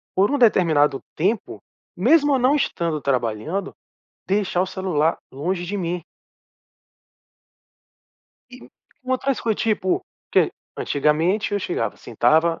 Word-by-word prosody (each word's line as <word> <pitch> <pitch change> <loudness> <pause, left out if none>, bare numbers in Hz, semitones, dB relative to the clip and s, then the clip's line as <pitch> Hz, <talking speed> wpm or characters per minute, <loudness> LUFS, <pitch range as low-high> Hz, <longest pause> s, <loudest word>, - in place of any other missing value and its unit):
por 195 +2 +3
um 285 - +1
determinado 160 - +3 0.2
tempo, 195 +7 -1 0.4
mesmo 290 -4 +4
eu - - +1
não 255 +4 +3
estando 170 - -1
trabalhando, 135 - -2 0.5
deixar 190 -2 +1
o - - -2
celular 180 -4 0
longe 175 +7 -3
de 200 +4 -4
mim. 175 -2 -3 2.5
E - - -11 0.4
com 255 - -7
outras 265 +1 0
coi 225 -2 0
tipo, 205 -4 0 0.3
que - - +4 0.3
antigamente 160 +9 +1
eu 205 - +1
chegava, 115 - -2
sentava, 155 +9 +2
180 Hz, 120 wpm, -22 LUFS, 155-210 Hz, 2.5 s, mesmo